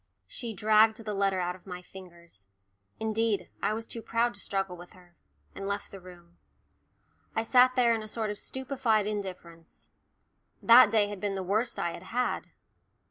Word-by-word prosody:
She 235 -2 -6
dragged 215 +2 +4
the 215 -2 -5
letter 195 -1 +1
out 180 0 -2
of 185 - -19
my 180 -1 -7
fingers 170 - -15 0.5
indeed, 220 -1 -1
I 215 - +1
was 225 +1 -5
too 230 - -8
proud 230 +2 0
to 200 - -8
struggle 195 -2 -2
with 175 0 -13
her 180 -2 -20 0.4
and 195 - -6
left 200 0 -4
the 195 - -9
room. 175 -1 -16 1.0
I 225 - +1
sat 255 +2 +5
there 240 -3 +4
in 225 - -1
a 215 - -8
sort 215 -1 -3
of 210 - -7
stupefied 250 -5 -1
indifference. 185 -5 -7 0.7
That 235 -1 +8
day 210 -1 +3
had 205 -1 -7
been 200 0 -2
the 190 - -3
worst 215 +6 -1
I 170 - -1
had - - -9
had. 250 +1 -1
205 Hz, 180 wpm, -29 LUFS, 185-225 Hz, 1.0 s, That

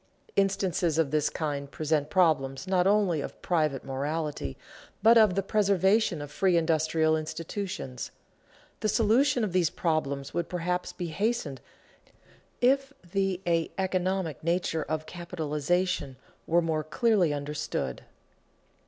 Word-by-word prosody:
Instances 190 -4 +1
of 160 -4 +2
this 155 -1 +2
kind 145 -3 -3
present 150 -1 -1
problems 155 -6 +2
not 185 -1 +2
only 195 -6 +3
of - - -7
private 155 -6 +1
morality, 140 - -3 0.5
but 225 +2 +7
of 215 -5 +6
the 195 - +1
preservation 200 -3 +2
of 145 - -9
free 185 +2 +2
industrial 160 -1 +2
institutions. 160 - -5 0.7
The 215 - 0
solution 235 +4 +3
of 200 -5 -2
these 180 -3 +3
problems 140 -6 -2
would 170 -1 -2
perhaps 180 0 -2
be 175 -2 -5
hastened 190 - -1 1.0
if 270 +2 +3 0.2
the 195 -2 0
a 165 -1 +1
economic 185 -5 -1
nature 170 -1 0
of 155 0 -3
capitalization 170 -3 -2 0.3
were 170 +1 +3
more 160 -2 0
clearly 190 - +2
understood. 145 - -3
170 Hz, 125 wpm, -28 LUFS, 155-195 Hz, 1.0 s, but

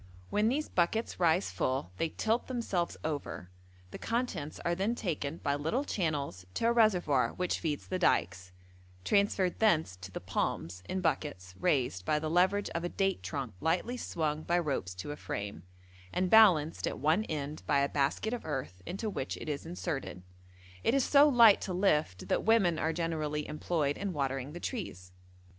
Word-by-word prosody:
When 210 +2 +3
these 295 +5 -1
buckets 190 +6 0
rise 170 +1 +2
full 130 -8 -1
they 165 - 0
tilt 225 +8 -1
themselves 225 -9 -2
over, 145 - -4 0.4
the - - -8
contents 230 - -2
is 170 0 +1
then 205 +5 0
taken 160 -8 -3
by 140 - -1
little 160 - -1
channels 150 - -2
to - - 0
a 230 - +5
reservoir 180 - +3
which 180 -1 -1
feeds 150 -4 -2
the 185 - -3
dykes, 95 - +1 0.5
transferred 200 -3 +2
thence 160 - +3
to 95 +1 -9
the - - -6
palms 90 +3 -2
in 190 - -1
buckets 95 - -2
raised 130 - +1
by 150 +10 +1
the 155 0 -2
leverage 190 +4 +2
of 170 - -3
a 175 - -1
date 195 0 0
trunk 135 -7 -4
lightly 180 +9 0
swung 155 -9 -2
by 170 +2 +1
ropes 135 - -2
to 90 +10 -6
a - - -4
frame, 100 - -5 0.5
and 185 0 0
balanced 180 -9 +5
at - - -3
one 160 +9 +2
end 150 -2 -4
by 140 - +3
a 140 - +2
basket 145 - 0
of 245 - -4
earth 130 - -4
into 195 +5 -3
which 130 - -3
it - - -8
is 150 +1 -3
inserted; 160 - -4 0.6
it 240 - +3
is 275 - +3
so 290 +3 +6
light 235 -6 +7
to 185 - -3
lift 155 - +1
that - - +1
women 195 -7 +3
are 160 - +1
generally 155 -2 -2
employed 150 -1 -1
in 200 -2 -2
watering 135 -1 -2
the 175 - -6
trees. 90 - -5
160 Hz, 180 wpm, -31 LUFS, 140-195 Hz, 0.6 s, light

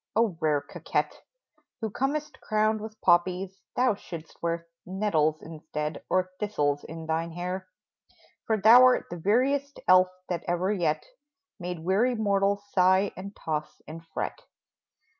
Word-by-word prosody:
O! 220 -5 +2
rare 150 -2 +2
coquette, - - -3 0.6
Who 220 -2 -3
comest 285 +6 -2
crowned 215 0 +1
with 220 0 -8
poppies, 180 +2 +2
thou 250 -2 +3
shouldst 170 -5 -10
wear 170 0 -2 0.2
Nettles 170 -5 0
instead, 155 -1 -5
or 185 0 +1
thistles, 145 -9 0
in 165 0 -8
thine 160 +1 -1
hair; 180 +2 -4 0.8
For 220 - +2
thou 225 +5 +8
'rt 255 -7 +4
the 175 - -4
veriest 265 - +1
elf 185 0 +7 0.2
that 175 -2 -3
ever 175 +3 +1
yet 155 -5 0 0.5
Made 175 -2 -5
weary 220 +7 +2
mortals 200 -2 +1
sigh 190 +1 +4
and 200 +2 -8
toss 155 -1 -4
and 165 +2 -8
fret 160 - -4
185 Hz, 140 wpm, -27 LUFS, 165-215 Hz, 0.8 s, thou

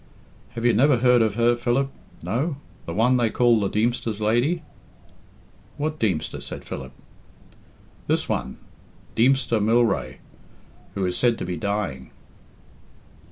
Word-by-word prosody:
"Have 115 0 -3
you 120 - +5
never 130 +4 +4
heard 125 0 +4
of 110 -2 +1
her, 120 +1 +3
Philip? 125 +3 0 0.3
No? 140 +7 -1 0.3
The 85 - -4
one 125 +4 +3
they 120 -2 +2
called 120 -1 +3
the 100 - +1
Deemster's 110 -1 -1
lady?" 120 +11 +1 1.1
"What 155 +1 -2
Deemster?" 95 -8 -1
said - - -7
Philip. 65 -2 -7 1.2
"This - - +1
one, 65 - -3 0.6
Deemster 120 -2 +3
Mylrea, 115 -1 +2 0.8
who 95 - -1
is 90 - -1
said 120 -2 +3
to - - -4
be 90 0 -3
dying." 95 -8 -3
115 Hz, 130 wpm, -24 LUFS, 105-125 Hz, 1.2 s, you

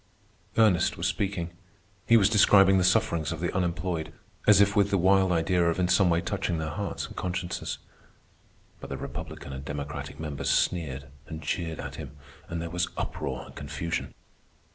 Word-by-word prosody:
Ernest 105 -7 +4
was - - -3
speaking. 95 -4 -1 0.6
He 115 - +7
was 100 -3 +5
describing 95 -3 +6
the - - +2
sufferings 85 -3 +2
of 80 - -4
the 85 +1 -2
unemployed, 90 -2 -1 0.4
as 105 -2 +7
if 100 +1 +4
with 100 -1 +4
the 100 - +2
wild 95 +1 +4
idea 85 +1 +2
of 85 - -1
in 90 -1 +2
some 90 0 +4
way 85 0 +2
touching 85 - -2
their 80 -1 -3
hearts 100 +6 -3
and - - -11
consciences; 90 -1 -3 1.0
but - - -9
the - - -4
Republican 70 - -7
and 65 0 -6
Democratic 70 0 -6
members 75 -3 -3
sneered 70 -6 0 0.2
and 80 -1 -7
jeered 80 +1 -2
at - - -6
him, 70 - -9 0.3
and 85 - -3
there 85 0 -5
was 90 0 0
uproar - - -3
and - - -14
confusion. 75 +4 -4
85 Hz, 175 wpm, -27 LUFS, 80-95 Hz, 1.0 s, He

